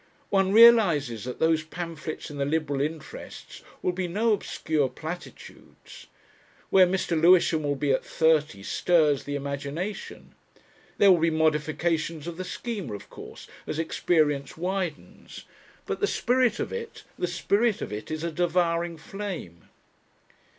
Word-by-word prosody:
One 195 -1 +3
realises 185 - +5
that 125 - -5
those 160 -1 +2
pamphlets 160 -1 -6
in 145 - -8
the - - +1
Liberal 145 -2 -1
interests 155 +1 -7 0.2
will 180 - +2
be 180 0 -3
no 215 +6 +1
obscure 155 -7 -1
platitudes. 160 +7 -10 0.6
Where 185 -1 +7
Mr. 185 0 -2
Lewisham 170 -2 +5
will 145 -1 -1
be 140 0 0
at 130 - +1
thirty 155 -10 +1
stirs 150 - +2
the 145 - -3
imagination. 140 +8 -5 0.6
There 200 -1 +6
will 175 - +5
be 165 +1 +3
modifications 155 0 0
of 170 -1 -6
the 185 - -4
Schema, 195 - -5
of 100 - -12
course, - - -11 0.2
as - - -3
experience 155 -4 0
widens. 180 -2 -5 0.4
But - - -3
the 410 - +1
spirit 250 - +1
of - - -3
it 465 -1 -7 0.2
the 180 - 0
spirit 205 +5 +1
of - - -5
it 105 - -6
is 155 0 -4
a 170 - -2
devouring 170 0 0
flame! 170 - -7
165 Hz, 145 wpm, -26 LUFS, 150-185 Hz, 0.6 s, Where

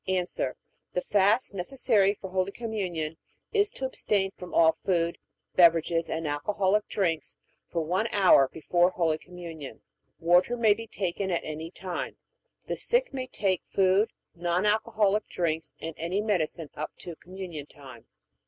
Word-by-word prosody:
A. 185 -1 +1 0.7
The - - 0
fast 205 - +3
necessary 200 0 +2
for 190 -2 -9
Holy 185 +1 0
Communion 185 -9 -3 0.4
is 415 -1 +4
to 265 - -5
abstain 200 -6 0
from 180 -1 -9
all 160 -1 +5
food, 170 -2 +1 0.4
beverages, 165 -1 +4
and 160 0 -2
alcoholic 195 +7 +1
drinks 170 -5 -1 0.3
for 170 - -1
one 185 +8 0
hour 185 -9 +6
before 175 +4 +2
Holy 165 -4 0
Communion. 165 -8 -9 0.4
Water 180 +8 +4
may 220 -3 +5
be 225 +2 -8
taken 190 -1 -2
at 170 -2 0
any 155 +1 -5
time. 185 0 -5 0.5
The - - -3
sick - - +2
may 260 -1 -3
take 190 -7 0
food, 195 +3 +3 0.2
non 175 +2 0
alcoholic 215 -1 +2
drinks, 160 -2 -2
and 165 0 -5
any 170 +5 -1
medicine 175 -7 -1
up 155 - -4
to 175 -2 -8
Communion 180 -5 -8
time. 130 -6 -13
185 Hz, 145 wpm, -28 LUFS, 165-205 Hz, 0.7 s, hour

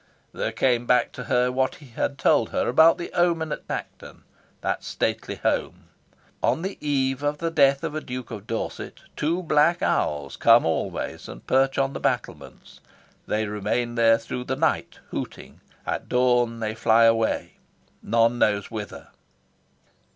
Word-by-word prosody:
There - - -2
came 120 -2 +1
back 125 - +3
to 125 - -8
her 125 +2 +2
what 130 +1 0
he 140 - -15
had 140 +4 -2
told 115 - +3
her - - -1
about 160 +7 +5
the 170 - -7
omen 170 -3 +1
at - - -5
Tankerton, - - -7 0.4
that - - -2
stately - - -2
home: - - -2 0.5
"On 165 - +1
the 195 +1 -5
eve 135 -2 0
of 145 0 -1
the 165 +1 -2
death 140 -2 +3
of 160 -2 -3
a 155 - -3
Duke 125 -3 -7
of 105 -2 -8
Dorset, 115 - -5
two 170 +5 -1
black 160 +2 +3
owls 70 -2 -1
come 115 +1 +5
always 80 - -3
and - - -11
perch 135 +1 +2
on 135 0 +1
the - - -5
battlements. - - -4 0.5
They 110 +1 0
remain 105 +3 -2
there 115 -1 +4
through 125 +2 -6
the 130 - -2
night, 160 +4 -1
hooting. - - -7 0.2
At - - -4
dawn 120 -2 +2
they 110 -1 -2
fly 110 +1 +3
away, 115 -1 +1 0.4
none 115 +2 +2
knows 105 0 +1
whither." 105 -4 -7
125 Hz, 160 wpm, -24 LUFS, 115-145 Hz, 0.5 s, about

